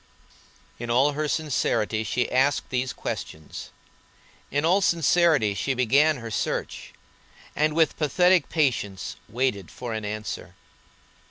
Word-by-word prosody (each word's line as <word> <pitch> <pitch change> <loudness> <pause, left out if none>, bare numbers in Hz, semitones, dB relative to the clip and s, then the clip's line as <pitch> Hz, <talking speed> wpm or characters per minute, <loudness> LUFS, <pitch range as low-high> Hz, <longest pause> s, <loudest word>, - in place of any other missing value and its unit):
In 120 0 -5
all 135 +5 +3
sincerity 140 -8 0
she 120 +3 -1
asked 135 +3 +1
these 130 0 -1
questions, 80 -1 -6 0.8
in 145 +3 0
all 185 +4 +4
sincerity 165 - +3
she 130 +6 -1
began 140 +5 +3
her 115 -2 -7
search, - - -3 0.6
and 155 0 +1
with 160 -1 +2
pathetic 180 +2 +3
patience 115 - -1
waited 115 -6 -1
for 120 -2 -6
an 110 -1 -4
answer. 105 +1 -5
130 Hz, 115 wpm, -25 LUFS, 110-155 Hz, 0.8 s, all